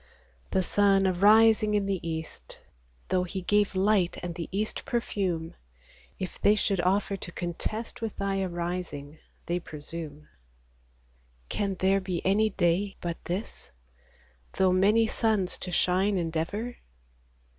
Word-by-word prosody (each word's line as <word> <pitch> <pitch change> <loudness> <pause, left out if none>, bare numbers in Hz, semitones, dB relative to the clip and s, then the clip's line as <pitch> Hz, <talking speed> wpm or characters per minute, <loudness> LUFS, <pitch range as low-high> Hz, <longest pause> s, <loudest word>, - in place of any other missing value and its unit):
The 190 - +1
sun 195 +1 +3
arising 210 +3 +5
in 205 -1 +1
the 195 -2 -1
east, 160 - -6 0.5
Though 185 -1 +2
he 185 +1 -5
gave 205 +1 +2
light, 190 -2 +2
and 175 -1 -3
the 170 -1 -6
east 210 +3 -2
perfume, 185 -8 -2 0.6
If 185 -2 -6
they 210 - +5
should 195 -3 0
offer 195 +2 +1
to 175 - -8
contest 180 +8 -4
With 225 -2 -3
Thy 195 -1 -1
arising, 170 -5 -4 0.3
they 175 +2 -1
presume. 150 -1 -8 1.2
Can 200 -2 -1
there 190 +1 +2
be 185 -2 -3
any 210 +3 +3
day 190 +1 +1
but 170 -1 -5
this, 180 - -5 0.8
Though 190 -1 +3
many 210 +5 +4
suns 215 -4 0
to 180 - -5
shine 190 +3 +2
endeavor 175 +8 -2
190 Hz, 130 wpm, -28 LUFS, 175-205 Hz, 1.2 s, arising